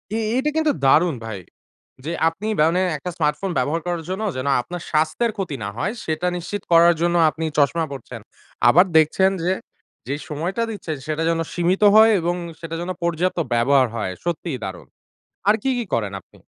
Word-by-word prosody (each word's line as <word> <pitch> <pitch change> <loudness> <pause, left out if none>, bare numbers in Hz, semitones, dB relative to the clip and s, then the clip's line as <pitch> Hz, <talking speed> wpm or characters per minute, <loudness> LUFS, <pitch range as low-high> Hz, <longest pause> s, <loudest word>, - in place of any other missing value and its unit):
এ - - 0 0.2
এটা 295 +3 +1
কিন্তু 315 -2 +3
দারুন 160 +2 +4
ভাই। 105 -4 -5 0.7
যে - - -3 0.2
আপনি 175 +6 -3 0.2
মানে 165 +4 +3 0.2
একটা 180 +5 -5
স্মার্টফোন 150 +5 0
ব্যবহার 150 +6 0
করার 175 -2 -2
জন্য 190 +4 -3
যেন 130 +2 -3
আপনার 175 +5 -7
স্বাস্থ্যের 160 +9 +1
ক্ষতি 175 -7 -3
না 100 - -3
হয় 200 - -1
সেটা 160 +3 -1
নিশ্চিত 185 +3 -5
করার 170 +1 +7
জন্য 175 0 +2
আপনি 160 +1 -6
চশমা 160 +3 +2
পড়ছেন। 135 -4 -8 0.5
আবার 180 +9 +6
দেখছেন 190 +5 +4
যে, 185 +2 +2 0.5
যে 140 - -1
সময়টা 170 +9 -3
দিচ্ছেন 165 -7 -5
সেটা 155 +1 -1
যেন 165 0 0
সীমিত 175 +3 0
হয় 220 +1 +8
এবং 175 +1 -1 0.2
সেটা 165 0 -6
যেন 175 - -5
পর্যাপ্ত 170 +1 0
ব্যবহার 130 +2 +4
হয়। 100 -5 -2
সত্যিই 170 -4 -2
দারুন। 95 -2 -7 0.6
আর 215 - +6
কি 270 - +1
কি 240 - -2
করেন 105 -4 0
আপনি? - - -23
165 Hz, 180 wpm, -22 LUFS, 150-185 Hz, 0.7 s, হয়